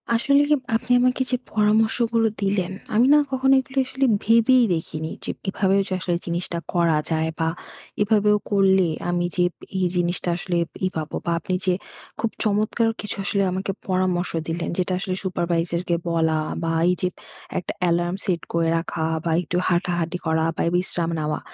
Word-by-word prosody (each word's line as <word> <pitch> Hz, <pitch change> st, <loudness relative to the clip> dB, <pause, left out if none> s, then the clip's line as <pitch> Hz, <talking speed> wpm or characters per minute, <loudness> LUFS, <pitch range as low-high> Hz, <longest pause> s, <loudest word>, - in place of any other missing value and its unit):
আসলে, 280 Hz, +5 st, +4 dB, 0.3 s
আপনি 250 Hz, +2 st, -2 dB
আমাকে 255 Hz, +1 st, +2 dB
যে -, -, +3 dB, 0.2 s
পরামর্শগুলো 225 Hz, +2 st, +2 dB
দিলেন, 195 Hz, -2 st, 0 dB, 0.2 s
আমি 235 Hz, +3 st, +5 dB
না -, -, +7 dB
কখনো 265 Hz, +1 st, +3 dB
এগুলো 265 Hz, +1 st, -7 dB
আসলে 270 Hz, +1 st, 0 dB, 0.2 s
ভেবেই 230 Hz, +3 st, +5 dB
দেখিনি। 160 Hz, -1 st, -4 dB
যে -, -, -2 dB, 0.2 s
এভাবেও 195 Hz, 0 st, +2 dB
যে -, -, -3 dB
আসলে 175 Hz, -1 st, -1 dB
জিনিসটা 170 Hz, 0 st, -3 dB, 0.2 s
করা 170 Hz, -3 st, +3 dB
যায় 160 Hz, 0 st, +1 dB
বা 165 Hz, -, +1 dB, 0.5 s
এভাবেও 210 Hz, 0 st, +4 dB
করলে 190 Hz, -2 st, +4 dB, 0.2 s
আমি 175 Hz, 0 st, 0 dB
যে 180 Hz, -, +3 dB, 0.3 s
এই 185 Hz, -, +2 dB
জিনিসটা 175 Hz, 0 st, 0 dB
আসলে 175 Hz, -1 st, -2 dB, 0.3 s
ই -, -, +3 dB
পাব। 155 Hz, -1 st, -4 dB
বা 170 Hz, -, 0 dB
আপনি 185 Hz, +3 st, -4 dB
যে 185 Hz, -, +3 dB, 0.5 s
খুব 230 Hz, 0 st, 0 dB
চমৎকার 215 Hz, +2 st, +1 dB
কিছু 210 Hz, -, -4 dB
আসলে 200 Hz, 0 st, +1 dB
আমাকে 190 Hz, +2 st, -2 dB, 0.2 s
পরামর্শ 185 Hz, -1 st, 0 dB, 0.2 s
দিলেন, 170 Hz, +1 st, -2 dB
যেটা 185 Hz, 0 st, 0 dB
আসলে 185 Hz, -1 st, -2 dB
সুপারভাইজারকে 170 Hz, -1 st, -1 dB
বলা 160 Hz, -1 st, +2 dB, 0.3 s
বা 165 Hz, -, 0 dB, 0.2 s
এই -, -, +4 dB
যে 185 Hz, -, +2 dB, 0.5 s
একটা 175 Hz, -, -5 dB, 0.2 s
এলার্ম 175 Hz, +1 st, +1 dB
সেট 180 Hz, -5 st, 0 dB
করে 165 Hz, -1 st, +2 dB
রাখা 165 Hz, -1 st, -3 dB, 0.2 s
বা 165 Hz, -, +1 dB
একটু 175 Hz, +1 st, -3 dB
হাঁটাহাঁটি 175 Hz, -1 st, 0 dB
করা 160 Hz, 0 st, +1 dB
বা -, -, -2 dB
বিশ্রাম 175 Hz, -2 st, 0 dB
নেওয়া। 150 Hz, 0 st, -1 dB
185 Hz, 165 wpm, -23 LUFS, 170-210 Hz, 0.5 s, না